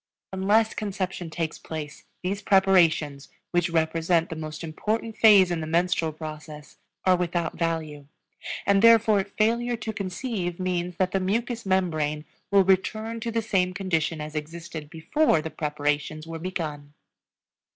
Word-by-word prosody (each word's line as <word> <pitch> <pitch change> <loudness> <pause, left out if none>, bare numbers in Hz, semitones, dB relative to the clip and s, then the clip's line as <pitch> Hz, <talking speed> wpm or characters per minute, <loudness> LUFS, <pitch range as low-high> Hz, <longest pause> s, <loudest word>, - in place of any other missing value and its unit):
Unless 210 +4 +2
conception 190 -4 -4
takes 160 0 -3
place 155 -2 -7 0.2
these 195 +2 -2
preparations, 175 -8 +3 0.2
which 175 0 +1
represent 165 +1 +1
the - - -3
most 155 +1 -6
important 215 +8 -3
phase 200 -5 +6
in 170 -2 -1
the 155 - -4
menstrual 170 0 +1
process, 155 -1 -9 0.3
are 185 -1 +5
without 175 -1 -1
value; 160 -4 -2 0.6
and 200 -1 +4
therefore 225 -3 +6
failure 230 +4 0
to 220 0 -5
conceive 185 -2 -3
means 180 -1 -2
that 185 -1 +1
the 195 - +1
mucous 230 +4 -2
membrane 155 -5 0 0.2
will 200 -1 +5
return 215 +4 0
to 230 - -3
the 230 0 -1
same 185 -4 0
condition 165 -4 -1
as 150 0 -6
existed 160 0 -6
before 165 - +2
the 160 +1 -5
preparations 150 +1 -2
were 165 0 -6
begun. 150 -5 -5
175 Hz, 140 wpm, -26 LUFS, 160-200 Hz, 0.6 s, phase